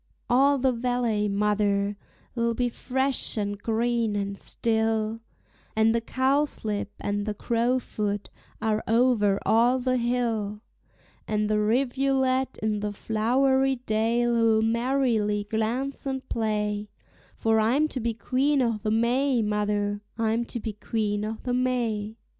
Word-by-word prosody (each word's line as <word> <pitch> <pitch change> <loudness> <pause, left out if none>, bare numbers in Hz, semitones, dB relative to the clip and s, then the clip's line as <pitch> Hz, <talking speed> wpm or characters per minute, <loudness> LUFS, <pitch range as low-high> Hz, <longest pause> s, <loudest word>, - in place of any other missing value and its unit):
All 275 +3 +5
the 260 0 +2
valley, 235 -3 0
mother, 205 0 +1 0.4
'll 235 -1 +1
be 245 0 0
fresh 265 +1 -1
and 205 -1 -1
green 230 -1 0
and 200 0 -2
still, 220 +1 0 0.6
And 220 +1 +4
the 230 - +1
cowslip 260 -5 0
and 205 +1 -2
the 210 - -2
crowfoot 230 -3 -1 0.3
are 220 -1 0
over 225 -4 +3
all 240 +3 +4
the 255 0 0
hill, 230 -4 -1 0.7
And 210 0 0
the 215 0 +1
rivulet 260 +3 +1
in 215 -1 0
the 210 0 -2
flowery 265 +6 +1
dale'll 230 -1 +2
merrily 230 -3 +1
glance 230 +7 -2
and 265 -1 -3
play, 210 -2 -1 0.5
For 225 0 +2
I'm 255 +8 +3
to 260 - -4
be 230 -1 -2
Queen 275 +5 +1
o'the 225 -4 0
May, 240 +3 +2
mother, 205 -1 -1 0.2
I'm 225 +1 0
to 235 - -5
be 220 -1 -4
Queen 210 -1 -2
o'the 220 +3 -3
May. 235 -4 -1
225 Hz, 125 wpm, -26 LUFS, 210-250 Hz, 0.7 s, All